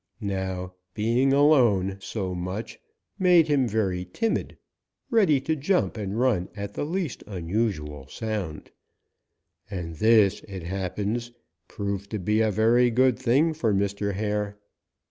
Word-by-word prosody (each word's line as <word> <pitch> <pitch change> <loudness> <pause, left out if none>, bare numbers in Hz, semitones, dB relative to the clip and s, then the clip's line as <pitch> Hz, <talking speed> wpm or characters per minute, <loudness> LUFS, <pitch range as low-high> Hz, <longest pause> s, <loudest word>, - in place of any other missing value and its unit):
"Now 95 -3 -3 0.2
being 120 +5 +2
alone 120 -10 +4
so 95 -2 -4
much 90 +5 -5 0.4
made 180 -4 +5
him 140 -4 +2
very 100 -5 0
timid, 155 - -2 0.5
ready 195 - +4
to 160 +3 0
jump 175 +6 0
and 105 0 -3
run 115 -8 +1
at 100 0 -6
the - - -3
least 170 -3 -3
unusual 85 - -3
sound, 105 - -5 1.0
and 85 -5 -5
this, 110 0 +4
it 95 -4 -7
happens, 100 +6 -3 0.4
proved 100 -1 -4
to 110 - -3
be 105 +3 +1
a 110 - +3
very 115 +4 +4
good 125 +1 +3
thing 135 +6 +3
for 115 -9 0
Mr. 100 0 -1
Hare. 105 0 -2
105 Hz, 130 wpm, -26 LUFS, 95-125 Hz, 1.0 s, made